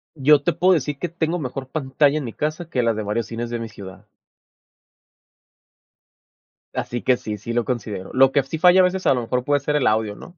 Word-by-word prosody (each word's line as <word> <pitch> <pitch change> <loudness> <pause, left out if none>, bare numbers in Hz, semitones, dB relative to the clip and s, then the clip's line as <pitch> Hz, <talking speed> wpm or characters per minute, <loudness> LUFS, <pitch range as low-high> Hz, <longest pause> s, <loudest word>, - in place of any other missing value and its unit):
Yo 145 0 +4
te 175 - +1
puedo 185 +4 +3
decir 145 -3 -1
que 175 - -2
tengo 170 +1 -2
mejor 130 -2 -5
pantalla 145 0 +1
en - - -5
mi 115 - -6
casa, 155 +3 -3
que 125 -6 0
las 115 -2 +1
de 110 - -3
varios 105 +2 -2
cines 115 +1 -5
de 120 - -3
mi 115 -1 -6
ciudad. 100 0 -12 2.7
Así 120 0 -3
que 130 -1 +2
sí, 105 -1 -5
sí 115 +4 -6
lo 120 -1 0
considero. 105 -6 -4
Lo 135 +1 +5
que 140 -2 +2
sí 145 +4 -5
falla 180 +2 +6
a - - +5
veces 185 +1 0
a - - +5
lo 125 - -1
mejor 125 +2 -2
puede 145 +1 +1
ser 150 +2 -2
el 145 -4 +2
audio, 110 -1 0
¿no? 175 - -13
130 Hz, 225 wpm, -22 LUFS, 115-155 Hz, 2.7 s, falla